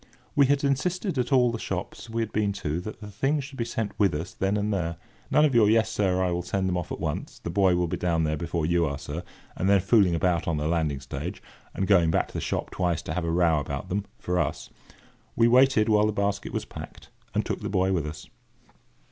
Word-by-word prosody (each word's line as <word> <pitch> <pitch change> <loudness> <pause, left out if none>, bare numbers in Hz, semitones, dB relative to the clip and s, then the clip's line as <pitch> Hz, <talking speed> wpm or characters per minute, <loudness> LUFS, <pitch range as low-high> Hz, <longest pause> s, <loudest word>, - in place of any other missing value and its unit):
We 140 -2 +5
had 140 +1 +2
insisted 170 +4 0
at 125 +3 -1
all 125 -3 +4
the 115 - -4
shops 95 +5 -5
we 115 0 -1
had 110 - -6
been 105 -1 0
to 85 -4 -3
that 110 +3 -8
the 105 -1 -8
things 135 +8 0
should 135 -1 -10
be 115 - 0
sent 115 -3 -3
with 100 -7 +3
us 85 +4 -5
then 95 +2 0
and 105 +1 0
there. 85 -3 -2 0.3
None 150 - +5
of 145 - +1
your 110 -3 +5
"Yes, 110 0 +3
sir, 95 -4 +1
I 90 - +1
will 85 0 -1
send 95 +1 -1
them 90 - 0
off 90 -1 -3
at - - -4
once: - - -4
the 85 - -6
boy 95 -1 +3
will 90 0 +1
be 85 - -3
down 85 -2 +1
there 75 0 0
before 85 +1 -2
you 85 +1 +2
are, 70 0 -3
sir!" 75 +3 -5 0.3
and 95 - 0
then 100 -1 +6
fooling 95 -2 +4
about 85 0 +1
on 85 -2 0
the 75 +1 -1
landing 80 -5 0
stage, 65 - -5 0.4
and 95 - 0
going 90 -5 +4
back - - +1
to - - -15
the - - -3
shop - - -2
twice 90 -3 -1
to 80 - -4
have 85 0 -2
a - - -1
row 85 -2 +3
about 70 - -5
them, 100 +2 -1
for 90 0 -1
us. - - -2 0.6
We 115 - +5
waited 125 -2 +5
while 105 -1 +4
the 110 - -1
basket 100 0 -1
was - - -3
packed, - - -10 0.3
and - - +1
took - - -3
the - - -3
boy 95 -1 +1
with 80 -5 -1
us. 75 +1 -7
95 Hz, 250 wpm, -26 LUFS, 85-110 Hz, 0.6 s, then